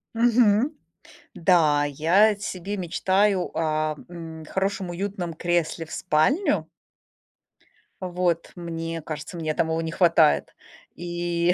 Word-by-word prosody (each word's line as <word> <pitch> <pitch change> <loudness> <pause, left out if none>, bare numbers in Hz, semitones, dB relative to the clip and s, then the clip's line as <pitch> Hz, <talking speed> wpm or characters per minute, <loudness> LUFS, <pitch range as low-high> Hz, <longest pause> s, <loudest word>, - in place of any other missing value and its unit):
Мгм. 235 +2 +4 0.6
Да, 155 -5 +3
я 175 +9 +3
себе 200 0 -5
мечтаю 190 +2 +1
о, 155 -1 0
мм, 165 -2 -9
хорошем 190 0 -2
уютном 180 -1 -4
кресле 170 0 -1
в - - -15
спальню. 190 - +1 1.3
Вот. 180 -2 -1
Мне 165 -1 -5
кажется, 155 +2 -7
мне 155 -2 -2
там 160 - 0
его 160 0 -1
не 165 0 -3
хватает. 165 -3 +3 0.4
И, 175 0 0
175 Hz, 110 wpm, -24 LUFS, 160-190 Hz, 1.3 s, Мгм